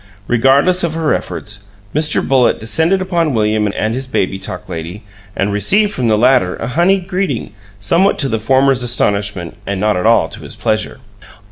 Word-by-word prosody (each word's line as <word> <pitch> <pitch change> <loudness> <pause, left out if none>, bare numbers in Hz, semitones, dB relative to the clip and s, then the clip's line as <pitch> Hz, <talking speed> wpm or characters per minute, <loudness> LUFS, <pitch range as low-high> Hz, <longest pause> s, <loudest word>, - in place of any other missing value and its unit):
Regardless 135 - +3
of 165 -2 -1
her 160 -2 +1
efforts, 105 -1 -5 0.3
Mr. 155 +1 +1
Bullitt 130 -3 +3
descended 160 - +1
upon 170 -6 0
William 105 -1 +1
and 110 +1 -1
his 130 +2 -4
Baby 95 -6 -1
Talk 90 -1 -6
Lady, 85 +4 -7 0.3
and 100 +1 -1
received 200 - +2
from 125 -2 -1
the 110 -1 +3
latter 125 -5 +3
a 115 - -5
honeyed 180 +6 +1
greeting, 185 - -2 0.3
somewhat 170 - +2
to 140 - 0
the 110 -3 -1
former's 130 +3 +2
astonishment 100 -7 -1
and 100 -1 -2
not 105 +1 +1
at 90 +4 0
all 115 -8 +4
to - - -9
his - - -6
pleasure. 110 +3 -2
120 Hz, 175 wpm, -15 LUFS, 105-160 Hz, 0.3 s, all